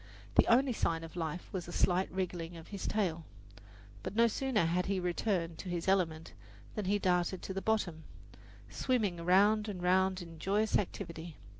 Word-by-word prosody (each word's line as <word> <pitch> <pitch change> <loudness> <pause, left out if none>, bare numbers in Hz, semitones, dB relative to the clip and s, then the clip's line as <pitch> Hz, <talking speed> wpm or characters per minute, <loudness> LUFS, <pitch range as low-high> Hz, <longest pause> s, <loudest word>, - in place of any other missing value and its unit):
The - - +5
only 255 +2 +4
sign 165 -6 0
of 165 - -9
life 165 0 -3
was 180 -3 -3
a - - -7
slight 180 +1 +2
wriggling 175 -2 -3
of 165 - -12
his 200 -2 -5
tail. 175 -6 0 0.8
But 190 - -5
no 230 +1 +6
sooner 235 -4 +1
had 180 +3 0
he 195 -1 0
returned 175 -2 -1
to 185 - -6
his 175 0 -3
element 165 -4 +1 0.4
than 210 - -3
he 200 +2 +2
darted 180 -1 +1
to 190 - -4
the 195 - -3
bottom, 185 -8 0 0.6
swimming 220 -9 0
round 205 +5 +4
and 195 -3 -5
round 190 +1 +3
in 165 -1 -11
joyous 205 +5 +1
activity. 170 -4 -6
185 Hz, 175 wpm, -33 LUFS, 170-205 Hz, 0.8 s, no